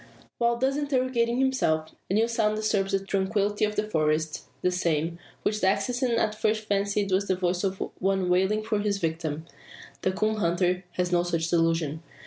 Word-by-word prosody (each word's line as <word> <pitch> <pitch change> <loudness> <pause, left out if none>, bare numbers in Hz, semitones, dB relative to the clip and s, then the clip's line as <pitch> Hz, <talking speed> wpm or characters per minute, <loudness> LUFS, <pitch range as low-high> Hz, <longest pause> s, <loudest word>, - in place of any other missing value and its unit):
While 235 0 +2
thus 265 +3 +1
interrogating 255 -4 +1
himself, 255 -13 +1 0.2
a 195 - +1
new 225 +2 +3
sound 220 -2 +1
disturbs 215 -2 0
the 195 0 0
tranquillity 200 +2 +1
of 210 0 -3
the 210 - 0
forest 155 -3 0 0.2
the 180 - +3
same, 170 -1 0 0.2
which 210 0 0
the 190 - +5
assassin 245 +5 0
at 220 -2 +1
first 215 0 0
fancied 200 -1 0
was 195 +2 +2
the 185 - +2
voice 180 0 -1
of 195 -1 -1 0.2
one 190 -1 +1
wailing 190 +4 +2
for 215 -1 0
his 205 -1 0
victim. 160 -3 -2 0.6
The 185 - +1
coon 215 +3 0
hunter 180 0 +1
has 180 0 -1
no 175 -1 +4
such 165 -1 -1
delusion. 165 -2 +1
195 Hz, 180 wpm, -27 LUFS, 175-215 Hz, 0.6 s, the